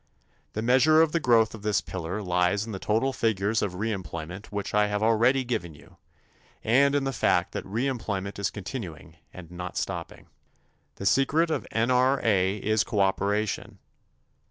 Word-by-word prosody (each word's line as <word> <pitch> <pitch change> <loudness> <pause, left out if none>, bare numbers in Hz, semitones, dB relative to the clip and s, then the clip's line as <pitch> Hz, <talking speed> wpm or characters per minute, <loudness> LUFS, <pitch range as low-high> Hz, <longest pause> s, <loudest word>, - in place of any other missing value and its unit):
The 110 - -3
measure 130 +6 +5
of 160 -1 +4
the 170 - +1
growth 115 -6 +3
of 110 - -9
this 105 -1 +1
pillar 95 +3 -5
lies 90 +3 +1
in 115 - -7
the 95 - -5
total 115 +7 0
figures 110 -1 0
of 100 -3 -2
reemployment 95 -3 -5
which 100 -1 -5
I 105 0 +3
have 105 +1 -1
already 120 +4 +3
given 110 -10 -3
you - - -18 0.7
and 140 +5 +4
in 145 - +1
the 135 0 -2
fact 90 -5 +1
that - - -4
reemployment 105 -3 -3
is 100 - 0
continuing 90 - -8
and 85 -2 -11
not 90 +1 -6
stopping. 90 -3 -5 0.7
The 100 - -7
secret 150 +9 +2
of - - -2
N.R.A. 115 -5 +2
is 110 +1 +1
cooperation. 100 0 -1
105 Hz, 155 wpm, -26 LUFS, 95-120 Hz, 0.7 s, measure